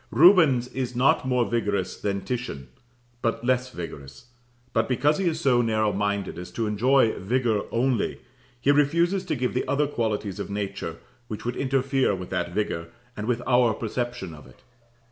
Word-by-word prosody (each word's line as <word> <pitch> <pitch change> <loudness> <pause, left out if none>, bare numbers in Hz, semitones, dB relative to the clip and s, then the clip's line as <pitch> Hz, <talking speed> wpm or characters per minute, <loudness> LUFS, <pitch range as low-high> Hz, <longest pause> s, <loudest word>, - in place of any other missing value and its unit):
Rubens 155 -8 +6
is 125 -2 -4
not 130 +1 +3
more 125 -2 +2
vigorous 100 -4 -1
than 100 -1 -2
Titian, 115 - -5 0.5
but 115 0 -1
less 130 0 +1
vigorous; 70 - -9 0.4
but 115 +2 +1
because 145 +5 +2
he 195 - 0
is 160 -1 0
so 130 -6 +3
narrow 110 -2 +1
minded 100 -2 -2
as 90 - -7
to 115 - -1
enjoy 115 +3 +3
vigour 115 +1 0
only, 120 -1 0 0.4
he 135 +4 +3
refuses 170 +6 +2
to - - -1
give 125 -1 -1
the 125 - -1
other 145 +1 +2
qualities 110 -8 -2
of - - -4
nature, 100 -5 -4 0.3
which 105 - -6
would 120 0 -2
interfere 135 -3 +1
with 90 -1 -8
that - - -1
vigour 85 -4 -2 0.3
and 105 +1 -5
with 120 -1 0
our 125 -3 +3
perception 120 -5 -4
of 75 - -13
it. 130 - -20
120 Hz, 170 wpm, -25 LUFS, 105-130 Hz, 0.5 s, Rubens